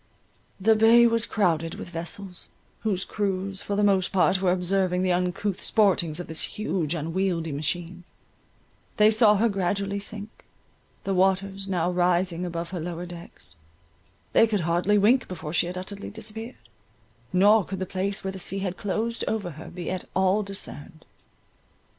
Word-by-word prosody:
The 220 +3 +4
bay 225 +2 +6
was 230 -1 +2
crowded 165 -6 0
with 175 - -8
vessels, 175 +2 -6 0.3
whose 195 -4 -1
crews, 195 -1 -2
for 205 - -3
the 210 - +2
most 195 -2 +3
part, 185 0 +3
were 185 -2 +3
observing 180 0 +1
the 185 - +2
uncouth 180 +2 -1
sportings 180 -7 +2
of 175 - -4
this 160 0 -3
huge 180 -7 -2
unwieldy 165 +1 -1
machine—they 175 +6 -3
saw 215 -1 +5
her 220 +3 +3
gradually 200 0 -1
sink; 210 +1 -7 0.6
the 195 - -1
waters 195 +1 +1
now 180 -2 0
rising 180 0 +1
above 170 0 -5
her 180 - -4
lower 170 +1 -5
decks—they 90 - -4
could 210 -3 0
hardly 175 +5 +2
wink 230 +6 +4
before 160 -4 -6
she 175 - +2
had 180 +1 -5
utterly 200 +2 -7
disappeared, 220 +3 -7 0.8
nor 205 +3 +5
could 190 +2 -5
the 185 - -3
place 195 +2 -2
where 190 - -2
the 190 - -6
sea 195 +2 -1
had 190 -1 -3
closed 225 +3 -2
over 200 -5 -2
her 155 +2 -10
be 175 -1 -5
at 185 -1 -3
all 190 +2 +3
discerned. 175 -6 -6
185 Hz, 155 wpm, -26 LUFS, 175-205 Hz, 0.8 s, bay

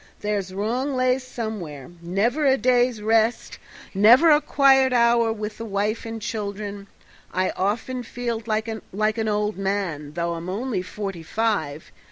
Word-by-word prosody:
There's 205 -3 -2
wrong 240 +8 -2
lays 255 +1 +2
somewhere 205 - -6
never 205 - 0
a 270 -1 +4
day's 245 -3 +2
rest, 225 +2 +1 0.3
never 235 - +6
a 295 0 +5
quiet 270 -3 +4
hour 235 -1 +4
with 215 -1 -5
the 230 - -5
wife 210 +2 -2
and 225 0 -5
children. 205 -2 -5 0.4
I 185 0 0
often 225 +6 -2
feel 235 -1 -4
like 220 0 -1
an 220 0 -2
old 210 -1 0
man, 185 -7 -2
though 170 +1 -2
I'm 170 +2 -6
only 210 0 -2
forty 195 -1 -6
five. 160 -6 -2
215 Hz, 145 wpm, -23 LUFS, 195-240 Hz, 0.4 s, never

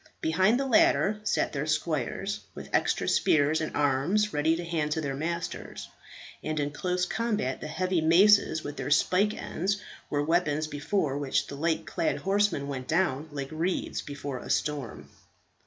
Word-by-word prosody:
Behind 190 +9 +2
the 275 - 0
latter 215 -4 +3
sat - - 0
their 145 +1 -2
squires, 155 - -1 0.2
with - - -9
extra - - +1
spears 155 +1 +3
and 155 - -4
arms 145 +10 +1
ready 155 +2 +2
to 170 +1 -5
hand 160 -3 -1
to 160 - -2
their 140 -2 -2
masters; 165 +4 -4 0.5
and 155 0 -2
in 145 0 -1
close 180 +3 -1
combat, 210 - -2
the - - -5
heavy 180 +2 0
maces 170 0 +5
with 145 - -6
their - - -3
spike 185 +8 +3
ends 200 +4 -2 0.3
were 145 0 0
weapons 155 -1 +1
before 145 0 -1
which 140 -2 0
the 140 - -8
light 160 +3 -1
clad 165 - -1
horsemen 195 -7 +1
went 130 -2 -5
down 160 -3 0
like 140 -2 -5
reeds 165 +4 -2
before 140 -2 -6
a - - -10
storm. 145 -6 -2
160 Hz, 165 wpm, -28 LUFS, 145-185 Hz, 0.5 s, maces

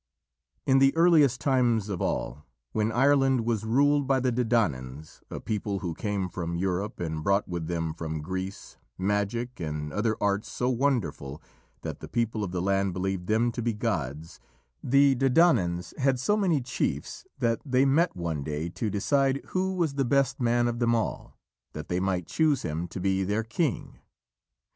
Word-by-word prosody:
In 135 0 +4
the 135 +2 +4
earliest 155 -7 +5
times 120 -6 +2
of 95 -4 -4
all, 70 +4 -3 0.2
when 110 +1 0
Ireland 135 0 +3
was 115 -3 0
ruled 140 +5 +2
by 135 -1 +3
the 130 0 +1
Dedannans, 80 - -1
a - - -5
people 105 -2 -2
who 85 -3 -3
came 100 0 -2
from 85 -2 -4
Europe 95 +3 -2
and 80 -2 -3
brought 100 +3 +2
with 85 -3 -4
them 80 -2 -2
from 80 -1 -5
Greece 95 +3 -6 0.2
magic 105 +6 -1
and 75 -2 -4
other 110 +1 0
arts 100 +1 0
so 125 - -1
wonderful 110 - -1 0.4
that - - -5
the - - -8
people 115 -2 -1
of 100 - -3
the 90 -1 -2
land 95 -1 +1
believed 95 0 -3
them 115 +2 +2
to 120 - -4
be 115 0 0
gods, 80 - -3 0.4
the 140 +2 +5
Dedannans 125 - +2
had 135 -1 +2
so 205 +11 +2
many 180 -9 +1
chiefs 125 - -3
that 115 -2 0
they 130 -1 +2
met 160 +6 +2
one 85 -5 -3
day 75 +3 -3
to 105 +5 -3
decide 135 +7 +1
who 190 +1 -1
was 165 -6 0
the 140 0 0
best 135 +1 +1
man 120 -1 +2
of 120 0 -2
them 120 -1 +2
all, 110 - -3 0.4
that 75 -1 -7
they 90 - 0
might 95 -2 -1
choose 155 - +1
him 80 +3 -3
to 90 - -7
be 95 +1 +1
their 105 +4 0
king. 120 +5 -2
110 Hz, 175 wpm, -27 LUFS, 90-130 Hz, 0.4 s, earliest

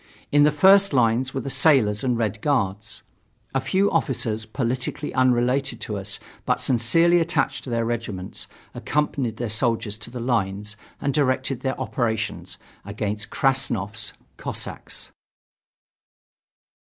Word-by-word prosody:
In 145 - +5
the 150 +1 +6
first 190 +5 +5
lines 125 +1 +2
were 135 - -3
the 135 - -4
sailors 135 -7 +3
and 125 -2 +1
Red 110 -2 -1
Guards. 105 -6 -1 0.5
A 135 - +1
few 195 +8 +2
officers, 110 -5 -1
politically 130 +5 -2
unrelated 130 0 +2
to 105 - -4
us 100 0 -4 0.3
but - - +1
sincerely 165 +9 +4
attached 170 0 0
to - - -6
their 115 -1 0
regiments, 110 -5 -4 0.3
accompanied 135 -6 -1
their 120 - -2
soldiers 110 -1 0
to 105 - -6
the 125 +1 -7
lines 105 -4 -1 0.2
and 140 - -1
directed 130 -2 +1
their 130 0 -2
operations 115 -4 -2 0.3
against 105 +1 -4
Krassnov's 115 -6 0 0.2
Cossacks. - - -6
120 Hz, 130 wpm, -24 LUFS, 110-135 Hz, 0.5 s, the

